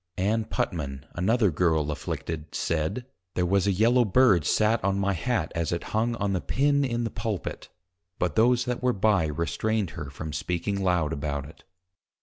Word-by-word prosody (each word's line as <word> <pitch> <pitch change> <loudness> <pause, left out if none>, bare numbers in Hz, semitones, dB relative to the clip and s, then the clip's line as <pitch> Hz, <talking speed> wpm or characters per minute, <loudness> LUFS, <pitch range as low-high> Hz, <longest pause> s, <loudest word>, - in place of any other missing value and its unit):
_ 90 - -1
Ann 110 +2 +1
Putman, 70 -10 -3
another 105 +3 +2
Girle 80 -2 +1
afflicted, 80 +1 -5
said, 80 +10 -1 0.3
There 90 - +1
was 100 +2 +2
a - - +4
Yellow 115 +6 +4
Bird 100 - +4
sat 110 +5 +2
on 100 0 +1
my 100 0 +1
Hat 95 -2 -1
as 85 -2 -1
it 85 -1 -2
hung 115 +2 +1
on 100 -3 -1
the 90 - -1
Pin 140 - +2
in 120 -3 -1
the 115 - -2
Pulpit; 105 -4 -4 0.5
but 90 - -1
those 120 +2 +4
that 125 -1 -2
were 125 -1 +2
by, 100 -5 +2
restrained 90 +6 -1
her 80 -5 -7
from 75 +2 -7
speaking 95 +5 -2
loud 85 -4 +1
about 70 -1 -3
it. 75 - -14
95 Hz, 180 wpm, -26 LUFS, 80-115 Hz, 0.5 s, a